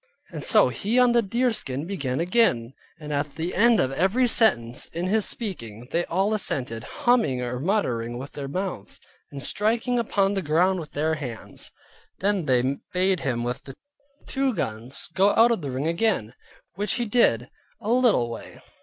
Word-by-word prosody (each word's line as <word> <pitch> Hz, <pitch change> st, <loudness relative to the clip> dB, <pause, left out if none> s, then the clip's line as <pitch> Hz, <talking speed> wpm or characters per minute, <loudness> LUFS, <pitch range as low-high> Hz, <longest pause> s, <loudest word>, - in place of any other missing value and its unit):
And -, -, -6 dB
so -, -, +5 dB
he 200 Hz, -, -2 dB
on 250 Hz, -1 st, +5 dB
the 235 Hz, 0 st, +4 dB
deerskin 215 Hz, -, -1 dB
began 145 Hz, -9 st, -3 dB
again; 170 Hz, -, +1 dB, 0.3 s
and 150 Hz, -1 st, -6 dB
at 145 Hz, +1 st, 0 dB
the 165 Hz, +2 st, -3 dB
end 230 Hz, +2 st, +4 dB
of 130 Hz, -, +1 dB
every 190 Hz, -, +2 dB
sentence 155 Hz, -, +3 dB
in 170 Hz, +2 st, -4 dB
his 210 Hz, +2 st, +2 dB
speaking, 120 Hz, -, -5 dB
they 170 Hz, +1 st, 0 dB
all 195 Hz, +5 st, 0 dB
assented, 125 Hz, -, -2 dB, 0.2 s
humming 230 Hz, -, +3 dB
or 125 Hz, 0 st, -3 dB
muttering 125 Hz, -, -1 dB
with 135 Hz, +3 st, -8 dB
their 140 Hz, -2 st, -6 dB
mouths, 180 Hz, -, -5 dB, 0.3 s
and 140 Hz, -1 st, -4 dB
striking 230 Hz, +3 st, +1 dB
upon 200 Hz, -3 st, +1 dB
the 195 Hz, -, -1 dB
ground 180 Hz, +4 st, +2 dB
with 155 Hz, -, -9 dB
their 155 Hz, +2 st, 0 dB
hands. 125 Hz, -7 st, -7 dB, 0.5 s
Then 195 Hz, -3 st, +1 dB
they 130 Hz, +1 st, +1 dB
bade 185 Hz, -1 st, +2 dB
him 120 Hz, -5 st, -2 dB
with 120 Hz, +1 st, -4 dB
the -, -, -10 dB, 0.5 s
two 270 Hz, -3 st, -1 dB
guns 120 Hz, -, -2 dB
go 195 Hz, +2 st, +3 dB
out 235 Hz, +1 st, +5 dB
of 230 Hz, -, 0 dB
the 145 Hz, -, -4 dB
ring 130 Hz, +3 st, -3 dB
again; 170 Hz, -, 0 dB, 0.4 s
which 205 Hz, +3 st, -1 dB
he 240 Hz, -, -1 dB
did, 165 Hz, -, +2 dB, 0.3 s
a 220 Hz, -1 st, -3 dB
little 240 Hz, -, +3 dB
way. 115 Hz, -, -9 dB
175 Hz, 175 wpm, -24 LUFS, 130-215 Hz, 0.5 s, so